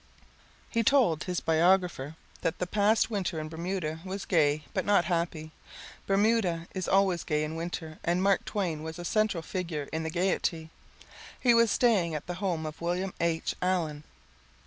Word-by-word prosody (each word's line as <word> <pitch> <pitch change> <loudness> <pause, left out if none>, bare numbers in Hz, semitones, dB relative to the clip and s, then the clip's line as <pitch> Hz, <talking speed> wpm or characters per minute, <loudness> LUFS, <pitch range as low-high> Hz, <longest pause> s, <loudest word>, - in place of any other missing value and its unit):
He 230 - +2
told 225 - +3
his 180 -2 -2
biographer 165 -3 +2 0.3
that 165 - -1
the 180 - -1
past 210 +4 +2
Winter 185 -6 -1
in 155 0 -5
Bermuda 165 -1 -3
was 195 +1 -5
gay 150 -4 +2
but - - 0
not 200 -4 +3
happy. 170 -2 -2 0.6
Bermuda 195 -4 +2
is 185 -2 -3
always 190 -3 +3
gay 150 -1 0
in 155 +1 -4
Winter 165 -1 -5
and 175 +2 +1
Mark 195 -1 +3
Twain 175 -7 -2
was 160 +1 -6
a 175 - -6
central 215 -4 +1
figure 165 -5 -4
in 160 - -1
the 160 - -3
gayety. 170 -2 -1 0.7
He 245 -2 +4
was 230 -1 +5
staying 200 -9 +2
at 150 - -5
the 175 - -4
home 170 -5 -1
of 155 +1 -7
William 180 +2 -1
H. 165 -1 0
Allen. 165 -5 0
175 Hz, 170 wpm, -29 LUFS, 160-195 Hz, 0.7 s, was